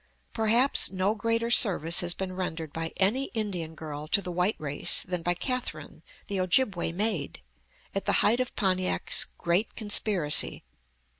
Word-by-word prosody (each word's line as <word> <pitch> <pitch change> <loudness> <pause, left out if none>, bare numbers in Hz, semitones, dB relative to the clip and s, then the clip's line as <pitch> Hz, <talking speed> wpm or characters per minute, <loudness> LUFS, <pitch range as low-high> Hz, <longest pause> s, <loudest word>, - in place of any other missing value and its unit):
Perhaps 230 +4 +4
no 190 +2 0
greater 230 +1 -1
service 175 -8 +3
has 175 -2 -1
been 190 -1 -5
rendered 165 -5 -5
by 165 0 -3
any 225 +8 +1
Indian 180 -7 -3
girl 155 -1 -7
to 180 - +3
the 180 -2 -6
white 180 +4 0
race 145 -2 0
than 180 -2 -4
by 175 +1 0
Catherine, 255 +6 -4 0.2
the 200 -1 -3
Ojibway 185 -2 +1
maid, 190 -5 -2 0.5
at 195 - -3
the - - +1
height 230 +4 +4
of 255 - -3
Pontiac's 185 -3 +1
great 175 +6 -1
conspiracy. 205 -7 +1
185 Hz, 150 wpm, -27 LUFS, 170-220 Hz, 0.5 s, Perhaps